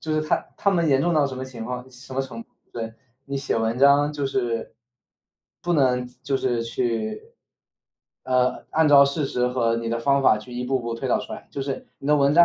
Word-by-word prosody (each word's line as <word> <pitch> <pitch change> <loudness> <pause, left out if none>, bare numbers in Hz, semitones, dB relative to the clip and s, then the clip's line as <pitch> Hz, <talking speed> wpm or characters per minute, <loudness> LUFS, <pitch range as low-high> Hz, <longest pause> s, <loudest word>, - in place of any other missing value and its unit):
就 155 -1 -2
是 155 - +1
他 - - +3 0.2
他 200 - +2
们 170 -4 +2
严 135 -2 +4
重 175 - +2
到 150 -3 +3
什 130 -1 -6
么 130 - -4
情 125 -3 -8
况 125 +2 -6
什 130 +1 -11
么 135 - +1
程 230 +12 -8
度， - - -34 0.2
对， 115 -1 -5 0.3
你 140 0 -3
写 135 - -1
文 115 +2 0
章 140 +1 +5
就 145 -2 -2
是 120 -4 -2 0.9
不 175 - 0
能 125 -4 +2 0.2
就 135 +1 0
是 125 -3 0
去 115 -2 -3 0.9
呃， 125 -1 +1
按 160 0 +3
照 140 -1 +8
事 140 +1 -1
实 125 -2 0
和 120 -2 +1
你 115 0 -3
的 115 +1 -1
方 140 +3 +3
法 120 - +5
去 110 +4 -11
一 125 +1 -3
步 130 +1 0
步 115 -1 -4
推 115 - -4
导 - - +3
出 - - -8
来。 - - -8
就 140 - -4
是 135 -1 -4
你 140 - -8
的 150 - +5
文 140 0 +3
章 170 +1 +8
130 Hz, 250 characters per minute, -24 LUFS, 120-140 Hz, 0.9 s, 照